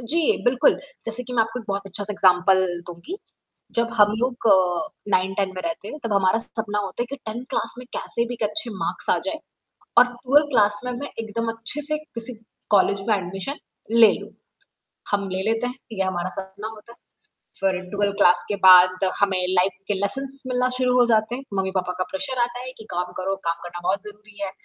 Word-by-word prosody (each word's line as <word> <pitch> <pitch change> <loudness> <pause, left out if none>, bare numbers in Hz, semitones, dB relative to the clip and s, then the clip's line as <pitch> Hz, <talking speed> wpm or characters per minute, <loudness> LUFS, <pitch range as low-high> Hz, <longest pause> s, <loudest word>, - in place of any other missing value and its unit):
जी, 330 - +1
बिल्कुल, 255 +4 +4 0.3
जैसे 225 +2 -1
कि 250 0 -8
मैं 230 - +5
आपको 225 +2 -5
एक - - -14
बहुत 200 0 -2
अच्छा-सा 205 +2 -1
एग्ज़ाम्पल 185 0 +4 0.2
दूँगी 175 - -7 0.6
जब 235 0 +1
हम 210 0 +6
लोग 245 -1 -1
अ, 180 -4 +3 0.2
9-10 190 +1 +1
में - - -3
रहते 330 - -4
हैं 300 - -7
तब 230 - -1
हमारा 195 +1 +3
सपना 220 -2 -4
होता 205 +3 -2
है - - -4
कि 280 - -4
10 225 +2 -5
क्लास 260 - -1
में 250 - -9
कैसे 235 - -1
भी 245 - -4
एक 235 - -7
अच्छे 215 +3 -4
मार्क्स - - -1
आ - - +3
जाएँ - - -2 0.6
और 245 - +9
12 270 +5 +3
क्लास 205 -5 +3
में 250 - -2
मैं 275 +4 -5
एकदम 225 +1 -3
अच्छे 225 +6 -3
से 305 - +1
किसी 250 -5 -5 0.4
कॉलेज 200 -1 +4
में 220 - +5
एडमिशन 195 +8 -4 0.3
ले 225 -2 +7
लूँ। 205 +1 -10 0.8
हम 200 -1 0
ले 185 0 -2
लेते 225 +2 0
हैं 250 - -5 0.2
ये 195 -3 -1
हमारा 185 -1 -2
सपना 195 +2 -6
होता 220 +1 -11
है - - -25 0.6
फिर 190 -1 +1
12 205 0 0
क्लास 180 -1 +5
के 205 - 0
बाद 185 0 +8 0.2
हमें 200 -2 +3
लाइफ 185 0 +2
के 205 - +1
लेसन्स 270 +8 -2
मिलना 250 0 +1
शुरू 250 -1 +2
हो 245 - +7
जाते 220 0 +2
हैं, 260 - -5
मम्मी-पापा 190 -1 -1
का 185 - +1
प्रेशर 260 +7 -3
आता 245 +1 -2
है 255 0 -7
कि 220 - -10
काम 180 0 -3
करो, 190 +1 -1
काम 165 0 +1
करना 175 0 -7
बहुत 195 +3 0
ज़रूरी 210 0 -13
है, 195 - -2
210 Hz, 205 wpm, -23 LUFS, 190-245 Hz, 0.8 s, और